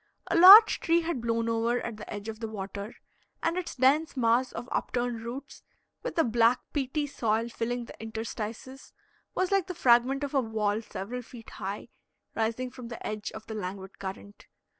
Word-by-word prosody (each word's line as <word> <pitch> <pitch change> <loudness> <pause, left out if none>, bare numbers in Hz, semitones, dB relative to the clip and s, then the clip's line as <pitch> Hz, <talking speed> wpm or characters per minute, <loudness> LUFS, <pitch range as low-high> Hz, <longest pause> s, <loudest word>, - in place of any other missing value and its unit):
A - - +2
large 400 +6 +10
tree 335 +1 +2
had 330 -7 -3
blown 230 0 0
over 230 +1 +1
at 235 -3 -6
the 210 - -9
edge 205 +1 -6
of 220 -1 -6
the 225 - -4
water, 200 0 -6 0.5
and 335 +1 +1
its 365 -1 -4
dense 275 +3 +2
mass 240 +1 +2
of 235 +2 -7
up - - -2
turned 240 -2 -1
roots, 250 +5 -8 0.4
with - - -5
the 325 - +4
black, 235 +1 +3
peaty 290 +1 -1
soil 230 -4 -1
filling 235 +1 -3
the - - -13
interstices, 225 +3 -6 0.4
was 370 0 0
like 390 -2 +2
the 365 - -5
fragment 255 +1 +3
of 285 - -4
a 270 - +3
wall 220 -2 -1
several 230 +3 -6
feet 235 -1 -13
high, 200 +2 -6 0.4
rising 230 +3 -2
from 245 -1 -9
the 235 - -8
edge 210 -1 -4
of 220 - -9
the 220 - -7
languid 190 -1 -6
current. 200 +1 -8
235 Hz, 185 wpm, -28 LUFS, 220-265 Hz, 0.5 s, large